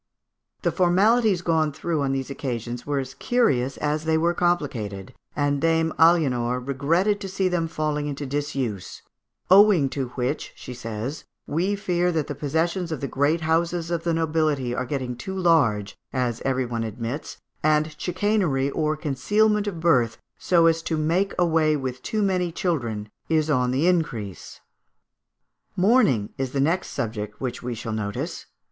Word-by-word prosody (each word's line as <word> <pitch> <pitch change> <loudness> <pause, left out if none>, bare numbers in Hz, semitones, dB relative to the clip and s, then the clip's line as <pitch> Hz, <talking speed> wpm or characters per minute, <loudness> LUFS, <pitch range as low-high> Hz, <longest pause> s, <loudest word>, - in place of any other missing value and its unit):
The - - +2
formalities 195 +2 +3
gone 160 -3 +2
through 155 +1 -2
on 135 -1 0
these 135 0 -3
occasions 120 -3 -4
were 145 -1 0
as 135 -1 -3
curious 135 - +1
as 150 +1 -1
they 160 0 +2
were 170 +2 +2
complicated; 125 - -1 0.2
and 145 -1 0
Dame 165 -1 +2
Aliénor 125 -7 +3
regretted 165 +10 +1
to 195 - -4
see 190 0 0
them 175 -2 0
falling 150 -2 -2
into 145 0 -4
disuse, 135 -8 -3 0.5
"owing 190 -7 +6
to 135 -2 -3
which," 125 -1 -2
she 125 - -8
says, 115 +4 -5 0.2
"we 180 +7 0
fear 180 -3 0
that 155 -3 0
the - - -4
possessions 165 +4 -1
of 155 - -3
the 140 - -3
great 145 +5 +1
houses 165 +1 0
of 170 -1 -1
the 170 - 0
nobility 155 -6 0
are 125 0 -2
getting 130 -3 -3
too 190 +9 -6
large, 135 - +2 0.2
as 125 -3 -1
every 130 -1 0
one 115 -1 -3
admits, 115 +6 -5 0.2
and 155 0 +2
chicanery 180 -8 0
or 155 0 0
concealment 210 +9 +1
of 180 -5 -3
birth, 125 -9 +2 0.2
so 170 -2 +3
as 165 0 +3
to 165 -1 -2
make 170 +6 +1
away 160 -3 +3
with 130 -3 -4
too 215 +7 -1
many 180 -3 +1
children, 120 - -2 0.2
is 155 -1 +2
on 125 -3 +2
the 130 +6 +1
increase." 125 - -1 1.1
Mourning 185 - +3
is 130 -1 -2
the 140 - 0
next 165 +7 +1
subject 105 -2 -4
which 125 -2 -4
we 125 -1 -4
shall 115 0 -5
notice. 105 -2 -4
150 Hz, 160 wpm, -24 LUFS, 130-170 Hz, 1.1 s, owing